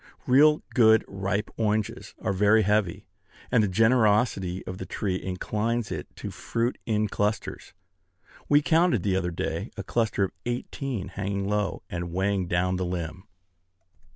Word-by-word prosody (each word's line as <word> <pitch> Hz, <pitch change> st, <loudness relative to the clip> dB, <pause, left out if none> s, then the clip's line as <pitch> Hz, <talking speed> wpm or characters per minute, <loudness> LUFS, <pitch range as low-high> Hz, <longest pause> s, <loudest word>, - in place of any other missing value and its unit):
Real 150 Hz, +4 st, +5 dB
good 110 Hz, -3 st, +5 dB
ripe 100 Hz, +2 st, -2 dB
oranges 110 Hz, -1 st, -1 dB
are -, -, -1 dB
very 105 Hz, +3 st, +4 dB
heavy; 105 Hz, -3 st, 0 dB, 0.5 s
and 115 Hz, -3 st, +4 dB
the -, -, +2 dB
generosity 105 Hz, -3 st, +2 dB
of 90 Hz, +1 st, -6 dB
the -, -, -5 dB
tree 95 Hz, -3 st, -2 dB
inclines 110 Hz, +5 st, -2 dB
it -, -, -4 dB
to -, -, -6 dB
fruit 115 Hz, +2 st, -2 dB
in 105 Hz, -1 st, +1 dB
clusters. 105 Hz, +1 st, -2 dB, 0.8 s
We 145 Hz, 0 st, +5 dB
counted, 165 Hz, -, +3 dB
the 95 Hz, -2 st, +1 dB
other 95 Hz, -2 st, 0 dB
day, 85 Hz, -, -3 dB
a -, -, -4 dB
cluster 110 Hz, -4 st, 0 dB
of 95 Hz, -, -1 dB, 0.2 s
eighteen, 120 Hz, -3 st, -3 dB
hanging 100 Hz, 0 st, -3 dB
low, 105 Hz, -3 st, -1 dB
and 85 Hz, 0 st, -4 dB
weighing 95 Hz, +1 st, 0 dB
down 90 Hz, +1 st, +1 dB
the 95 Hz, -, -1 dB
limb. 90 Hz, -1 st, -5 dB
105 Hz, 150 wpm, -26 LUFS, 95-115 Hz, 0.8 s, Real